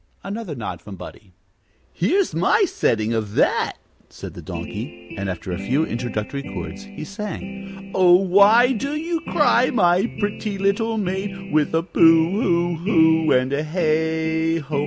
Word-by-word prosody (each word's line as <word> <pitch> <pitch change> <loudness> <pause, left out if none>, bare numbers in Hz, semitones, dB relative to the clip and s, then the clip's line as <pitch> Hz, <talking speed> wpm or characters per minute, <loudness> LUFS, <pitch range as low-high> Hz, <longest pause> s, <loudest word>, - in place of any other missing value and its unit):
Another 200 -5 -5
nod 95 -8 -6
from 100 0 -10
Buddie. 95 +2 -12 0.6
"Here's 370 - +1
my 415 - +3
setting 115 - 0
of 110 -2 -3
that," - - +2 0.4
said - - -9
the - - -9
Donkey; - - -8
and 100 0 -4
after 90 +1 -5
a 90 - -3
few 130 +11 0
introductory 120 +1 -4
chords, 145 - -7
he 205 0 -9
sang: 195 -1 -8
"'Oh, 180 -2 +6
why 200 +7 +5
do 275 +5 -2
you 330 +1 -2
cry, 255 -4 +3
my 185 -2 +3
pretty 205 0 -3
little 220 +3 0
maid, 195 0 -4
With 155 +1 +2
a 165 - +1
Boo 165 -1 +4
hoo 175 -4 +1
hoo 160 -3 +3
and 130 +2 +2
a 145 +2 0
Heigho?' 160 -1 0
175 Hz, 150 wpm, -21 LUFS, 150-205 Hz, 0.6 s, Oh